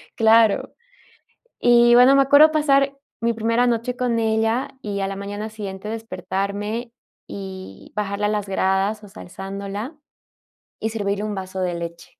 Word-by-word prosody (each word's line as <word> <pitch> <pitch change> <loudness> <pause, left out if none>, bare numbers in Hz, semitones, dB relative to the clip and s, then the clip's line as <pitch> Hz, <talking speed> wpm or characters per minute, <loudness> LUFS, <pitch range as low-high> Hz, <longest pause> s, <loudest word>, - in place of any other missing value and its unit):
Claro. 225 -1 +4 0.9
Y 240 0 +6
bueno, 250 +3 +7
me 275 - +6
acuerdo 285 +3 +6
pasar 275 -2 +2 0.2
mi 235 0 +1
primera 230 +2 +1
noche 240 +1 -1
con 245 -2 0
ella, 225 +2 +1
y 200 -1 -3
a 195 - -1
la 195 - -5
mañana 205 +2 -5
siguiente 205 -1 -7
despertarme 215 +1 -4 0.3
y 190 -1 -9
bajarla 205 0 -1
a - - +1
las 210 -2 -2
gradas 195 +2 0
osea, 200 0 -12
alzándola, 200 - -6 0.8
y 220 - -2
servirle 205 -2 -2
un 215 -1 -3
vaso 190 0 -5
de 180 -1 -1
leche. 170 0 -8
215 Hz, 150 wpm, -22 LUFS, 195-235 Hz, 0.9 s, bueno